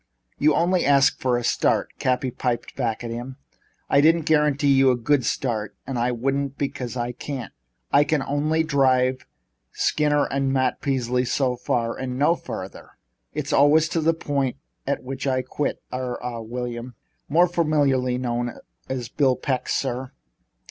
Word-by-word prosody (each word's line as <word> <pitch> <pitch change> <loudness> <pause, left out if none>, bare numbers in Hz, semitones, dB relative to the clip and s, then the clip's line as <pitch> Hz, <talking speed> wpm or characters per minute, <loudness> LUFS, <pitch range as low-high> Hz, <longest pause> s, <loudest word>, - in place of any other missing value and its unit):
"You 150 +1 +4
only 175 +1 +2
asked 140 -1 +4
for 125 -2 +2
a 120 - -3
start," - - +1
Cappy 130 0 0
piped 120 -1 -3
back 120 -3 -2
at 115 - -4
him. 120 +3 -6 0.5
"I 140 - +4
didn't 165 +2 +4
guarantee 150 -2 +3
you 135 0 +5
a 125 - +4
good 130 +3 +1
start, 110 -4 -2
and 130 -2 -3
I 120 +1 +1
wouldn't 135 +3 -1
because 130 -3 -3
I 120 0 -2
can't. 125 -2 -6 0.4
I 145 - +6
can 150 -1 0
only 155 +3 0
drive 130 -3 +2 0.5
Skinner 145 -1 +2
and 135 0 -1
Matt 130 -1 0
Peasley 125 -2 0
so 130 0 0
far 120 -1 -1
and 130 -1 -4
no 150 +5 +3
farther. - - -8 0.4
There's - - -2
always 155 +4 +4
a 165 0 +3
point 140 -4 -1 0.3
at 140 - -1
which 135 +2 -5
I 130 -1 +1
quit 140 +3 -3
er 125 -1 -3
ah 120 -2 -4
William." 120 +1 -5 0.3
"More 170 +5 +5
familiarly 145 -7 +1
known 120 -1 -2 0.3
as 130 -3 -3
Bill 135 -1 +2
Peck, 130 -2 -2
sir." 130 -1 -2
130 Hz, 160 wpm, -24 LUFS, 125-145 Hz, 0.5 s, I